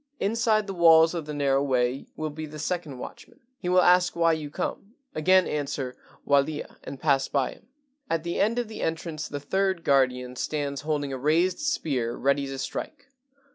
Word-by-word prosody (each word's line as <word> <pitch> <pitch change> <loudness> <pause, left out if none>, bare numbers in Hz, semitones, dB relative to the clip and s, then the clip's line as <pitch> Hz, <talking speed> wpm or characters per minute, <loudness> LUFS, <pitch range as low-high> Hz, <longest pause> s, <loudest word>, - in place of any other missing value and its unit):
"Inside 215 0 +1
the 195 - -5
walls 165 -2 +6
of 165 -3 -4
the 150 - -4
narrow 140 -1 +2
way 130 -1 0
will 155 -1 -3
be 155 +1 -6
the 155 +1 -9
second 155 -3 -3
watchman. 125 - -10 0.2
He 180 - -3
will 180 0 +5
ask 180 0 +4
why 165 -1 +3
you 155 -2 -4
come; 195 - -5 0.2
again 185 +4 +4
answer, 140 -3 -3 0.3
'Walia/ 145 +2 +1
and 135 - -8
pass 135 -2 +2
by 135 -3 0
him. - - -17 0.4
"At 165 -1 0
the 170 0 -3
end 225 +4 +2
of 240 -2 -1
the 220 - -8
entrance 160 -1 -3
the 145 - -5
third 190 +4 0
guardian 125 -2 +2
stands 140 0 -3
holding 145 -2 -2
a 130 - -4
raised 165 +6 +2
spear 140 - -1
ready 140 +1 +1
to 135 0 -5
strike. 280 - -6
155 Hz, 185 wpm, -26 LUFS, 140-180 Hz, 0.4 s, walls